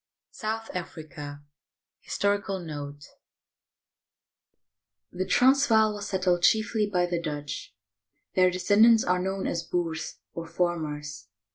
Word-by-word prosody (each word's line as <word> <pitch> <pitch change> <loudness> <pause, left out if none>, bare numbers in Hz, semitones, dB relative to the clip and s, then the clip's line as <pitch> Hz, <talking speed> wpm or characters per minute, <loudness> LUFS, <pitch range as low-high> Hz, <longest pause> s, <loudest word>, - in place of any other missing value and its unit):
SOUTH 225 +1 -4
AFRICA 150 -4 -7 0.6
HISTORICAL 200 -1 -1
NOTE 145 -3 -7 2.1
The 185 +1 -3
Transvaal 245 -5 +4
was 205 0 -6
settled 185 -2 +1
chiefly 215 +1 +3
by 180 -2 +2
the 175 -1 -2
Dutch. 145 -6 -5 0.6
Their 185 0 +5
de 180 - -3
scendants 220 +4 +5
are 180 0 +2
known 190 +1 -2
as 170 - -1
Boers, 165 -2 -3 0.2
or 165 0 -6
farmers. 155 - -3
180 Hz, 110 wpm, -27 LUFS, 160-205 Hz, 2.1 s, Their